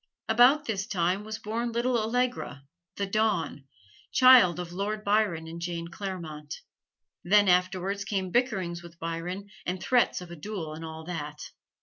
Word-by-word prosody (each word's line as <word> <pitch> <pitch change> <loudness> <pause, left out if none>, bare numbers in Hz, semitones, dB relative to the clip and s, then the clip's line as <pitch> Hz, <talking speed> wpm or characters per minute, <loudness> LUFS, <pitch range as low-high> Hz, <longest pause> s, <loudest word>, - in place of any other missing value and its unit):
About 250 +7 +5
this 205 -4 -2
time 185 -1 0
was 215 +1 -5
born 230 +3 -3
little 240 +2 0
Allegra, 235 - -1 0.3
"the 200 - -1
Dawn," 195 -9 0 0.5
child 250 -10 +7
of 175 -1 -5
Lord 210 +3 -3
Byron 200 -6 +1
and 165 +1 -8
Jane 170 -1 -4
Clairmont. 170 -6 -6 0.7
Then 205 +3 +5
afterwards 185 +2 +1
came 195 -2 -2
bickerings 190 -8 0
with 170 -1 -13
Byron 175 +5 -5
and 180 +1 -3
threats 245 +6 +2
of 180 -1 -10
a - - -7
duel 165 -2 -5
and 160 +1 -8
all 160 0 -7
that. 150 -3 -6
190 Hz, 150 wpm, -28 LUFS, 170-215 Hz, 0.7 s, child